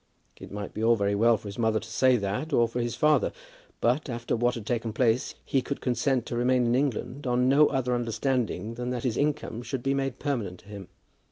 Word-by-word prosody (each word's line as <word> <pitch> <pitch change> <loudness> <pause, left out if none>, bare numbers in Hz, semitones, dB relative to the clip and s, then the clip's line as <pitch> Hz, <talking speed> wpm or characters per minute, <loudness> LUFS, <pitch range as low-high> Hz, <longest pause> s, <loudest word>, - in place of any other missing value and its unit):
It - - -11
might 100 -1 -6
be 110 - -4
all 115 +1 +5
very 100 -1 0
well 115 +2 +4
for 105 - -11
his 100 +3 -7
mother 110 -1 +2
to 110 - -10
say 125 +4 +3
that, 105 +10 -3
or 120 -4 +4
for 120 +2 -3
his 120 0 -2
father; 150 0 +3 0.5
but, 130 +5 +1
after 120 -1 -2
what 120 +1 +1
had 115 -3 -7
taken 115 -1 -2
place, 120 +1 +1
he 135 - +1
could 140 - -4
consent 125 0 0
to - - -4
remain 125 +1 +2
in 120 - +2
England 135 +1 -1
on 125 +1 +2
no 145 +3 +6
other 130 -3 0
understanding 120 -3 -1
than 125 +1 -4
that 125 -2 -3
his 125 -4 0
income 145 -5 -1
should 125 0 -4
be 135 0 +1
made 135 -2 -2
permanent 115 - -3
to 100 - -19
him. 100 -3 -8
120 Hz, 230 wpm, -27 LUFS, 110-130 Hz, 0.5 s, no